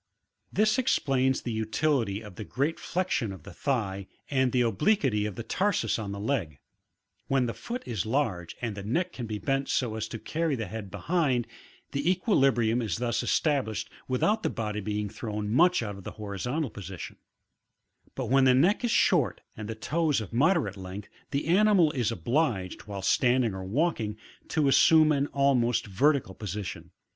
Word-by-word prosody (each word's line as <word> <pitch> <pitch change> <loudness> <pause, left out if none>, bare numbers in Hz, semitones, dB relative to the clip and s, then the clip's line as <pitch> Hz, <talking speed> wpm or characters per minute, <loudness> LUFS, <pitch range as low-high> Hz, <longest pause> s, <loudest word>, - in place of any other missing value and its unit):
This 215 +3 +2
explains 135 - +1
the 120 - -3
utility 110 -1 0
of 105 -3 -10
the 110 - -7
great 140 +9 -1
flexion 175 - -1
of 95 - -10
the 100 - -11
thigh 100 -5 -2 0.2
and 130 -2 +2
the 125 - +2
obliquity 115 - +2
of 105 - -6
the 115 - -5
tarsus 165 - 0
on 105 -2 -4
the 100 - -5
leg; 100 - -2 0.7
when 135 -2 +2
the 115 - -2
foot 245 +2 -6
is 115 -6 -2
large 110 - -1
and 115 -3 -2
the 100 - -6
neck 125 - -1
can 120 -3 -5
be 110 -1 -3
bent 135 +4 -1
so 120 -4 0
as 110 0 -3
to 115 - -6
carry 160 +5 -1
the 115 -3 -3
head 105 -3 -7
behind, 140 - 0 0.5
the 140 +4 0
equilibrium 135 - +2
is 110 -2 -2
thus 120 -1 0
established 130 -9 0 0.2
without, 205 - +1
the - - 0
body 105 -1 -3
being 105 0 -2
thrown 105 0 -4
much 175 +3 +4
out 105 -2 -4
of 100 - -11
the - - -7
horizont^ 110 - -3
position; 95 -3 -8 1.0
but 130 - -3
when 135 +3 +4
the 130 -1 +6
neck 180 - +3
is 240 - +1
short - - +2
and 105 0 -7
toes 155 -3 +1
of 110 -2 -7
moderate 135 - +2
length, 95 +2 -8 0.2
the 140 +1 -1
animal 185 -2 +4
is 120 -5 0
obliged, 115 - -1
while 100 -2 -6
standing 120 0 +3
or 95 0 -5
walking, 110 - 0 0.3
to 155 -3 +1
assume 155 +3 +6
an 140 -1 +1
almost 135 -4 +2
vertical 130 +1 +1
position. 100 -1 -6
120 Hz, 175 wpm, -28 LUFS, 105-145 Hz, 1.0 s, the